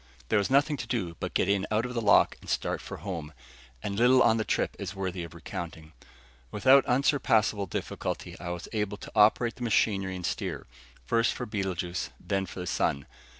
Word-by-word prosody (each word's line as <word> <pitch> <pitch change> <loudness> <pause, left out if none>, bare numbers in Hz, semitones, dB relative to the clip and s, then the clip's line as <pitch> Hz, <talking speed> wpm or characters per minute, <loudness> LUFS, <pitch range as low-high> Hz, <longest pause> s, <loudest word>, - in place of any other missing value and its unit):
There 110 - +4
was 100 - 0
nothing 145 +2 +3
to 120 - -6
do 100 -9 -2
but - - -4
get - - +2
in 100 0 +1
out 110 +2 +1
of 125 - -5
the 115 - -1
lock 100 -3 +5
and - - -11
start - - -1
for - - -7
home, 80 -6 -6 0.5
and 100 - -3
little 125 +2 +6
on 110 - +4
the 110 - 0
trip - - -1
is 100 -1 -5
worthy 95 -2 -3
of 85 - -9
recounting. 80 -2 -7 0.6
Without 130 - +5
unsurpassable 115 -6 +2
difficulty, - - -4
I 85 - -5
was 85 -1 -5
able 105 -2 -1
to - - -10
operate 110 +2 +4
the - - -13
machinery 100 -4 +1
and 90 -1 -5
steer, - - -3 0.4
first 115 - +2
for 125 - -4
Betelguese, 95 -4 -3
then 95 -1 -2
for 90 - -7
the - - -4
sun. 70 -5 0
100 Hz, 195 wpm, -28 LUFS, 90-115 Hz, 0.6 s, little